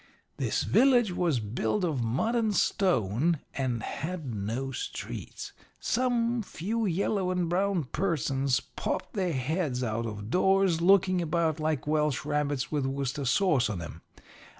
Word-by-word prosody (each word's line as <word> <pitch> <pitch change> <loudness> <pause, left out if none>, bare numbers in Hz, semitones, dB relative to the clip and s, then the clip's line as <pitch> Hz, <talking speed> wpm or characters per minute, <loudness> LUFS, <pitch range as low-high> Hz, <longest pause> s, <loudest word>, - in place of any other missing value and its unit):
"This - - 0
village 245 -6 +4
was 170 -7 +1
built 110 - -1
of 150 -8 0
mud 130 - 0
and 220 -4 +1
stone, 165 - +2 0.2
and 125 -4 -2
had 155 -4 -4
no 115 +6 -3
streets. 130 - -6 0.3
Some 240 -1 +1
few 215 +3 -2
yellow 190 +1 0
and 180 -2 0
brown 185 0 +1
persons 140 -4 0
popped - - -4
their 185 -5 0
heads 135 -1 -1
out 115 0 -1
of 105 0 -6
doors, 190 -2 +3
looking 185 0 +4
about 165 -2 0
like 155 -3 -1
Welsh 150 -2 0
rabbits 145 -3 -1
with 145 -3 0
Worcester 135 +1 -2
sauce 135 - +3
on 100 -4 -3
em. 85 0 -8
155 Hz, 140 wpm, -28 LUFS, 130-190 Hz, 0.3 s, village